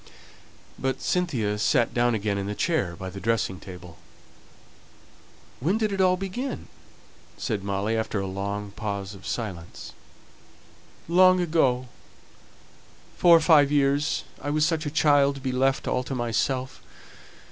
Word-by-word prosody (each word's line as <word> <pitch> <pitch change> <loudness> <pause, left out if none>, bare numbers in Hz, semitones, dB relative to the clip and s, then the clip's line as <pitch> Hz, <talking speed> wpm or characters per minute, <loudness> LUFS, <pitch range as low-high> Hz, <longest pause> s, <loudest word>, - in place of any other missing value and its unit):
But 135 0 -1
Cynthia 120 - -1
sat 115 +2 +2
down 120 -1 +2
again 100 -1 -1
in 100 - -3
the 105 - -3
chair 130 - 0
by 95 0 -7
the 100 - -8
dressing 100 -3 -1
table. 90 -2 -11 1.6
"When 175 - +1
did 215 -2 0
it 195 -1 0
all 185 -1 +4
begin?" 195 +8 -5 0.7
said 105 -5 -3
Molly, 100 +3 -1
after 110 -2 -1
a 95 - -2
long 100 +2 -4
pause 100 -1 -5
of 95 - -11
silence. 90 -8 -6 1.1
"Long 185 +2 +5
ago 135 -7 +1 1.3
four 170 -1 +7
or - - 0
five 150 -4 +5
years. 145 +1 +1 0.2
I 145 - -4
was 150 +1 +2
such 160 -2 -1
a - - 0
child 145 -2 +3
to 135 - -9
be 130 -1 -2
left 135 +1 +1
all 125 - +1
to 135 - -4
myself. 125 +2 -2
125 Hz, 145 wpm, -25 LUFS, 100-155 Hz, 1.6 s, four